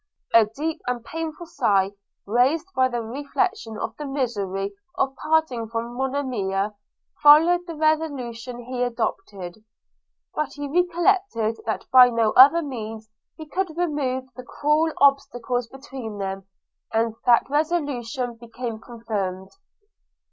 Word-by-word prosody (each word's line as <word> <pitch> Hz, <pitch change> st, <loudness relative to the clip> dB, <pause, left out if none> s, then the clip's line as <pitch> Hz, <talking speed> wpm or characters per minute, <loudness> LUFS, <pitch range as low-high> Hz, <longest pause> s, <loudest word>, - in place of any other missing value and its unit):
A 230 Hz, -1 st, +7 dB
deep 300 Hz, +9 st, -4 dB
and 245 Hz, -2 st, -2 dB
painful 325 Hz, +1 st, -5 dB
sigh, 200 Hz, -, +1 dB, 0.3 s
raised 255 Hz, +9 st, +2 dB
by 260 Hz, 0 st, +4 dB
the 240 Hz, -2 st, -3 dB
reflection 280 Hz, -, -2 dB
of -, -, -4 dB
the 295 Hz, -, -5 dB
misery 200 Hz, -8 st, -2 dB, 0.2 s
of 270 Hz, 0 st, 0 dB
parting 310 Hz, -8 st, +1 dB
from 230 Hz, +1 st, -4 dB
Monimia, 245 Hz, -7 st, -1 dB, 0.5 s
followed 330 Hz, +5 st, +6 dB
the 335 Hz, -, -6 dB
resolution 260 Hz, -6 st, -1 dB
he 250 Hz, +1 st, -4 dB
adopted; 210 Hz, -5 st, -3 dB, 0.7 s
but 305 Hz, -2 st, -2 dB
he 290 Hz, 0 st, -5 dB
recollected 350 Hz, -, +1 dB
that 220 Hz, -, -2 dB
by 255 Hz, -1 st, +9 dB
no 230 Hz, -2 st, +2 dB
other 290 Hz, +6 st, +7 dB
means 220 Hz, -5 st, -7 dB, 0.3 s
he 315 Hz, -, -8 dB
could 335 Hz, +1 st, -3 dB
remove 290 Hz, -7 st, -1 dB
the 255 Hz, -, -7 dB
cruel 300 Hz, +5 st, +1 dB
obstacles 250 Hz, -3 st, +2 dB
between 265 Hz, -4 st, -8 dB
them, 195 Hz, -1 st, -4 dB, 0.4 s
and 225 Hz, 0 st, +1 dB
that 235 Hz, -1 st, +5 dB
resolution 285 Hz, -5 st, -1 dB
became 235 Hz, -1 st, -6 dB
confirmed. 205 Hz, -5 st, -4 dB
250 Hz, 125 wpm, -24 LUFS, 225-300 Hz, 0.7 s, by